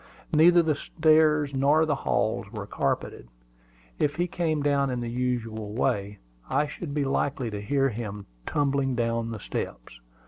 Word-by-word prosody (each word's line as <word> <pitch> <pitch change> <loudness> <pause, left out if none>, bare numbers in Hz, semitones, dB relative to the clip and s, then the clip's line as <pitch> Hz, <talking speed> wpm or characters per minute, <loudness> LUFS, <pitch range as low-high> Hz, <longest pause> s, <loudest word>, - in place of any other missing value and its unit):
Neither 170 +3 +6
the 155 -1 +2
stairs 155 -1 +3
nor 145 +4 +3
the 155 - +1
halls 110 -6 -1
were 105 -3 -5
carpeted. 100 - -2 0.7
If 145 -1 +1
he 175 - +1
came 160 -4 -1
down 140 -1 +2
in 125 -1 -2
the 120 -1 -4
usual 115 -4 -2
way, 105 -4 -1 0.3
I 150 - +2
should 150 0 -6
be 145 -2 +1
likely 135 -3 -1
to 105 -1 -4
hear 135 +5 +1
him 105 -3 -6 0.2
tumbling 140 -2 +1
down 115 -1 -1
the 115 -2 -5
steps. - - -6
135 Hz, 160 wpm, -27 LUFS, 115-150 Hz, 0.7 s, Neither